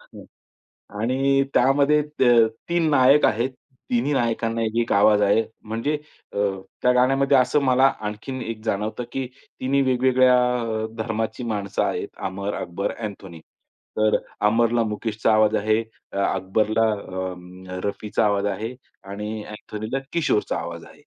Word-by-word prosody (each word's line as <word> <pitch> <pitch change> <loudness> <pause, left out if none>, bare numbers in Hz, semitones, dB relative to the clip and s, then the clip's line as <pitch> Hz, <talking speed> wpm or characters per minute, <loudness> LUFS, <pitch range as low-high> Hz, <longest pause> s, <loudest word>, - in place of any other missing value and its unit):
हां. - - -14 0.8
आणि 135 +3 +2
त्यामध्ये 140 +3 +4 0.2
त - - -1
अ, 120 -2 +6 0.2
3 170 -2 +2
नायक 140 +1 +5
आहेत. 115 +4 +1 0.4
3न्ही 125 +4 +1
नायकांना 115 -2 0
1-1 115 +1 -1
आवाज 105 +1 +5
आहे. 105 +2 +3 0.3
म्हणजे 115 +7 -1 0.4
अ, - - -6 0.4
त्या 125 - +4
गाण्यामध्ये 135 +2 +3
असं 130 +3 +3
मला 130 0 +4 0.2
आणखीन 130 +5 -6
एक 115 -2 -5
जाणवतं 110 +2 -2
की 135 -1 -2 0.3
3न्ही 135 +2 +1
वेगवेगळ्या 130 0 +4 0.3
अ, 110 -1 -2
धर्माची 110 +1 -3
माणसं 105 -4 -2
आहेत. - - -2 0.2
अमर, 100 +2 -4
अकबर 85 +3 -3
अँथोनी. 100 -6 -7 0.6
तर 110 0 +3
अ, - - +2 0.3
अमरला 115 +2 +2
मुकेशचा 110 0 -1
आवाज 110 0 +4
आहे. 110 +2 +2 0.3
अ, - - -6 0.2
अकबरला 110 +4 +1
अ, 95 -3 -4 0.5
रफीचा 105 +2 -1
आवाज 100 -1 +1
आहे 110 +5 -5 0.4
आणि 105 +2 -5
अँथोनीला 105 +4 -5
किशोरचा 155 -10 +1
आवाज 85 -1 -7
आहे. - - -17
115 Hz, 140 wpm, -23 LUFS, 105-130 Hz, 0.8 s, अ